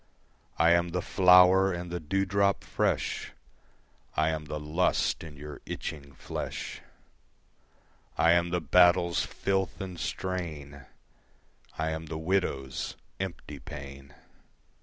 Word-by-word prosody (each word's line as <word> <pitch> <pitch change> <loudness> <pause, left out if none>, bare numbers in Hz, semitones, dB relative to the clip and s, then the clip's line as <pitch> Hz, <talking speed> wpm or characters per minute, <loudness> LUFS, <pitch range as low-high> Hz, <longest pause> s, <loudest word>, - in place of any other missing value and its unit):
I 85 +2 +5
am 85 0 +3
the 90 +1 -2
flower 90 +1 +6
and 85 0 -5
the 90 - -2
dewdrop 95 +4 +1
fresh, - - -1 0.8
I 80 - +3
am 80 -1 -4
the 75 +1 -4
lust 80 +5 0
in 75 -2 -10
your 75 0 -9
itching 70 -3 -6
flesh. - - -5 1.4
I 80 +1 +5
am 85 0 +3
the 90 0 -1
battle's 90 +1 +4
filth 95 -1 -2
and 95 -3 -6
strain, 75 -8 -5 0.9
I 80 0 -1
am 80 0 -5
the 80 +1 -5
widow's 80 -7 -1 0.2
empty - - -6
pain. 70 0 -10
85 Hz, 115 wpm, -29 LUFS, 75-90 Hz, 1.4 s, flower